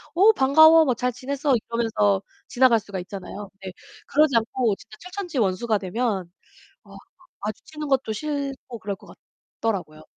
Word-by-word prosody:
"어, 400 +6 +7
반가워. 315 +2 +7
뭐 255 - +2
잘 250 +2 -1
지냈어?" 275 +2 -1
이러면서 220 -4 0 0.3
지나갈 245 -2 +4
수가 200 -2 -7
있잖아요. 195 +2 -8
네, 190 - -5 0.4
그러지 295 -3 +3
않고 230 -1 +1
진짜 215 +2 -15
철천지원수가 240 - -1
되면 195 -1 -2 0.6
어 - - -14 0.4
마주치는 295 +8 -6
것도 265 -5 +1
싫고 275 -2 -4
그럴 200 -1 -4
것 - - -15 0.5
같더라고요. 180 -9 -3
235 Hz, 325 characters per minute, -24 LUFS, 205-280 Hz, 0.6 s, 어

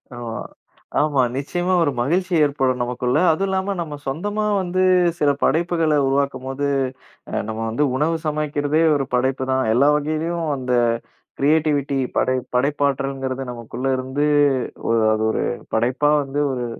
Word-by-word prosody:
ஆமா, 115 -2 -5 0.6
ஆமா. 145 -3 +2 0.2
நிச்சயமா 175 +6 -1
ஒரு 145 - +1
மகிழ்ச்சி 180 +7 0
ஏற்படும் 130 -3 0
நமக்குள்ள. 125 +2 -1
அதுவும் 195 +5 0
இல்லாம 190 +1 -1
நம்ம 150 -3 -5
சொந்தமா 205 +9 -2 0.2
வந்து 185 +1 0 0.4
சில 145 - +3
படைப்புகள 165 0 +2
உருவாக்கும்போது, 135 0 -1 0.6
அ - - -8
நம்ம 110 0 -4
வந்து 120 +7 0
உணவு 155 +4 +1
சமைக்கிறதே 150 0 0
ஒரு 135 -2 0
படைப்புதான். 130 +1 0
எல்லா 140 +5 +4
வகையிலேயும் 155 +3 -2
அந்த 125 -1 -2 0.7
கிரியேட்டிவிட்டி 145 -1 +2 0.2
படை 130 - +2 0.2
படைப்பாற்றல்ங்கிறது 135 -1 -1
நமக்குள்ள 120 +2 -5
இருந்து 130 +3 -1 0.6
ஒரு 115 -1 +2
அது 110 - -1
ஒரு - - -1 0.3
படைப்பா 125 +6 +2
வந்து 140 +2 -4
ஒரு 125 -2 -3
140 Hz, 130 wpm, -21 LUFS, 130-155 Hz, 0.7 s, எல்லா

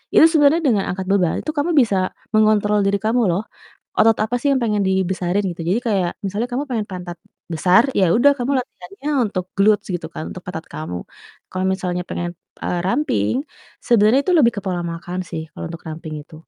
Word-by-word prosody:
itu - - +9
sebenernya 310 +1 +4
dengan 210 -6 +2
angkat 190 +1 -3
beban 185 -4 +2
itu 310 - -2
kamu 295 +4 +1
bisa, 220 -5 +1 0.4
mengontrol 215 -1 +3
diri 200 - +2
kamu 230 +3 +2
loh, 175 +4 0 0.6
otot 225 0 +5
apa 220 +3 -3
sih 285 - +2
yang 275 - +3
pengen 210 -3 +1
dibesarin 190 0 0
gitu 170 -1 -6
jadi 200 - +2
kayak 195 -6 +1 0.2
misalnya 205 +5 -2
kamu 255 +4 -1
pengen 220 -4 -1
pantat 180 -2 -6 0.4
besar 180 +6 +5 0.2
ya 195 - +5
udah 270 +5 +6
kamu 245 +2 -1
latihannya 220 +2 -7 0.2
untuk 185 -3 -3
glutes 205 +1 +3
gitu 175 -2 -4
kan - - -5
untuk 185 - -9
pantat 170 -2 -6
kamu, 155 - -4 0.5
kalo 185 - -3
misalnya 180 -2 -3
pengen, 175 0 -3 0.3
eee, 175 - -1
ramping 195 - +1 0.5
sebenernya 235 +2 +5
itu 370 - +1
lebih 235 -6 +5
ke - - -2
pola 180 -2 -1
makan 175 +2 -6
sih 160 - -4
kalo - - -9
untuk 165 0 -8
ramping 155 0 -6
itu, 155 - -17
200 Hz, 195 wpm, -20 LUFS, 180-230 Hz, 0.6 s, itu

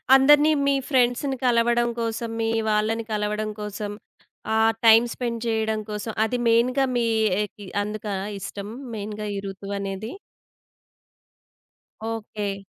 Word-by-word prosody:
అందరిని 295 +3 +6 0.2
మీ 280 - +4
ఫ్రెండ్స్‌ని 260 +1 +2
కలవడం 240 0 +3
కోసం, 230 0 -2
మీ 225 - +1 0.2
వాళ్ళని 220 +2 +1
కలవడం 210 0 -1
కోసం, 210 0 -4 0.6
ఆహ్, 225 0 +4
టైమ్ 225 +2 +8
స్పెండ్ 235 -2 -3
చేయడం 220 -1 0
కోసం, 210 +1 -4
అది 245 +3 -1
మెయిన్‌గా 250 +4 +3
మీ 235 -1 +1 0.3
ఆహ్, 210 - -2
కి 205 -2 -10 0.2
అందుకా 210 -1 -4 0.2
ఇష్టం 200 +1 -6 0.3
మెయిన్‌గా 210 0 -5
ఈ - - -2
ఋతువనేది? 195 +2 -5 2.0
ఓకే. 210 -3 -4
220 Hz, 120 wpm, -24 LUFS, 210-235 Hz, 2.0 s, టైమ్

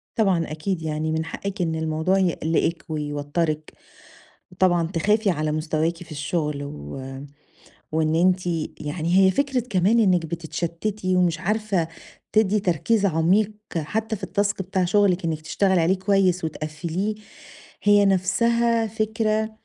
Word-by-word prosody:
طبعًا 185 -8 +1
أكيد 165 +3 -3
يعني 155 0 -2
من 160 0 -1
حقِك 200 +4 -5
إن 165 -2 0
الموضوع 160 +4 0
يقلقِك 170 -2 0
ويوترِك 150 +1 -2 0.8
وطبعًا 175 -2 +2
تخافي 205 +5 +2
على 155 -3 -1
مستواكِ 155 +2 -1
في 165 - -13
الشغل، 150 -1 -2
و 75 - -7 0.9
وإن 160 0 +1
أنتِ 180 +2 +2 0.3
يعني 160 +3 -1
هي - - +5
فكرة 270 +5 0
كمان 195 +5 +3
إنك 180 -6 +3
بتتشتتي 170 +4 -2
ومش 180 -1 +2
عارفة 200 -3 0 0.4
تدي 215 -1 +3
تركيز 195 +4 +1
عميق 185 +5 +2 0.2
حتى 220 +8 -2
في 190 -1 -6
الtask 200 +1 0
بتاع 185 0 0
شغلِك 185 -1 +2
إنك 160 -2 -1
تشتغلي 190 +3 +1
عليه 175 +4 +3
كويس 190 -2 +2
وتقفِّليه 160 +6 -3 0.7
هي، 205 0 +5
نفسها 230 +5 +2
فكرة 220 0 -1
180 Hz, 130 wpm, -23 LUFS, 160-205 Hz, 0.9 s, هي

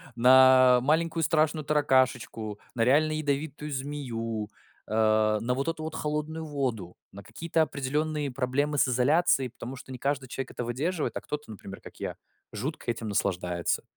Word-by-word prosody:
на 130 0 +7
маленькую 165 +3 +1
страшную 155 -1 +2
таракашечку, 130 -7 +1 0.2
на 115 - +2
реально 150 +5 +4
ядовитую 150 0 -2
змею, 120 -6 -4 0.4
э, 110 0 +3
на 125 +2 0
вот 135 +4 -2
эту 165 -1 -3
вот 160 0 -5
холодную 155 +1 -3
воду, 125 - -3 0.2
на 100 +1 -11
какие-то 165 +8 -1
определённые 150 0 -1
проблемы 135 +3 -1
с 135 - +4
изоляцией, 135 +2 +3
потому 125 +2 -8
что 130 0 -11
не 130 - -6
каждый 135 0 -2
человек 130 +1 -5
это 120 - -4
выдерживает, 150 +8 -2
а - - -5
кто-то, 150 -6 -6
например, 100 -1 -10
как - - -13
я, - - -4 0.4
жутко 130 +7 -5
этим 115 -2 -3
наслаждается. 90 -3 -1
130 Hz, 155 wpm, -28 LUFS, 115-150 Hz, 0.4 s, на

